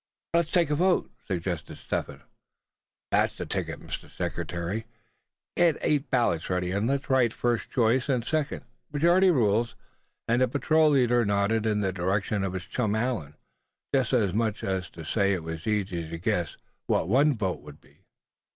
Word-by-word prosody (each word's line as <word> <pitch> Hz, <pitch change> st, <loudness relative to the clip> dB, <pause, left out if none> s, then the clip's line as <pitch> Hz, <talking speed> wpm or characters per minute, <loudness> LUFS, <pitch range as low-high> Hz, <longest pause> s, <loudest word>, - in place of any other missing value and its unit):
"Let's 170 Hz, -2 st, +2 dB
take 170 Hz, -5 st, +2 dB
a -, -, +3 dB
vote!" 180 Hz, +3 st, +2 dB, 0.2 s
suggested 85 Hz, -4 st, -3 dB
Step -, -, -2 dB
Hen. -, -, -12 dB, 0.9 s
"That's -, -, +3 dB
the -, -, -6 dB
ticket, -, -, -3 dB
Mr. -, -, -7 dB
Secretary, 85 Hz, +6 st, -4 dB, 0.7 s
get 170 Hz, -3 st, +3 dB
eight 145 Hz, -2 st, +1 dB
ballots 115 Hz, -11 st, +1 dB
ready, 90 Hz, -1 st, 0 dB
and 100 Hz, +4 st, 0 dB
let's 140 Hz, +1 st, -1 dB
write 130 Hz, -5 st, +3 dB
first 120 Hz, -1 st, -1 dB
choice 125 Hz, +3 st, +2 dB
and 125 Hz, -4 st, +1 dB
second, 155 Hz, -1 st, -2 dB, 0.3 s
majority 170 Hz, +6 st, +4 dB
rules," 115 Hz, -, +2 dB, 0.5 s
and 120 Hz, +2 st, +2 dB
the 130 Hz, -, +5 dB
patrol 155 Hz, +3 st, +3 dB
leader 120 Hz, -4 st, +3 dB
nodded 105 Hz, +2 st, +1 dB
in 105 Hz, -1 st, +1 dB
the 95 Hz, -2 st, 0 dB
direction 95 Hz, +3 st, 0 dB
of 95 Hz, -1 st, -2 dB
his 90 Hz, -2 st, -4 dB
chum 110 Hz, -4 st, -1 dB
Allan, 110 Hz, -, -2 dB, 0.6 s
just 130 Hz, -4 st, +2 dB
as 110 Hz, -8 st, +2 dB
much 110 Hz, 0 st, -1 dB
as 95 Hz, -3 st, -2 dB
to 80 Hz, -, -10 dB
say 100 Hz, +4 st, +2 dB
it 90 Hz, -4 st, -3 dB
was 80 Hz, +2 st, -6 dB
easy 95 Hz, -6 st, -1 dB
to 85 Hz, -, -5 dB
guess 85 Hz, -, -1 dB, 0.3 s
what -, -, +1 dB
one 135 Hz, +5 st, +3 dB
vote 95 Hz, -4 st, -2 dB
would 75 Hz, 0 st, -12 dB
be. -, -, -25 dB
110 Hz, 170 wpm, -27 LUFS, 95-135 Hz, 0.9 s, the